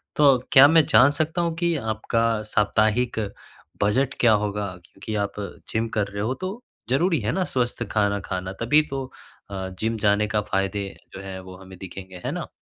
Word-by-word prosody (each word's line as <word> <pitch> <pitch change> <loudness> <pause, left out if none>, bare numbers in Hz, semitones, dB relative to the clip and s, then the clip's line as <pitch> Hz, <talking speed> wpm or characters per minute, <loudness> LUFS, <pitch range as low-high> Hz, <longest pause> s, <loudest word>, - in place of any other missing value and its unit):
तो 140 -3 +6
क्या 135 +2 +9
मैं 160 0 +5
जान 140 -2 +6
सकता 155 +4 -1
हूँ 170 -1 -1
कि 170 0 0
आपका 115 -1 0 0.2
साप्ताहिक 110 +3 +2 0.6
बजट 120 +7 +2
क्या 120 - +5
होगा? 105 -1 -1 0.2
क्योंकि 105 +4 -7
आप 100 - -3 0.4
जिम 110 +1 -1
कर 105 -1 +1
रहे 100 0 -5
हो 120 +4 0
तो 185 - -2 0.4
ज़रूरी 165 +5 +2
है 105 +2 -1
ना, 190 - 0
स्वस्थ 120 -6 -1
खाना 100 -1 +1
खाना 95 0 -3
तभी 150 +7 +5
तो 135 -1 -3 0.5
अ, 95 -1 -4
जिम 115 +1 -1
जाने 105 0 +2
का 105 0 0
फ़ायदे 100 -1 -1 0.3
जो 95 - -7
हैं 95 -1 -7
वो 95 0 -11
हमें 95 0 -13
दिखेंगे, 95 -1 -9
है - - -1
ना? - - -4
110 Hz, 185 wpm, -24 LUFS, 100-135 Hz, 0.6 s, क्या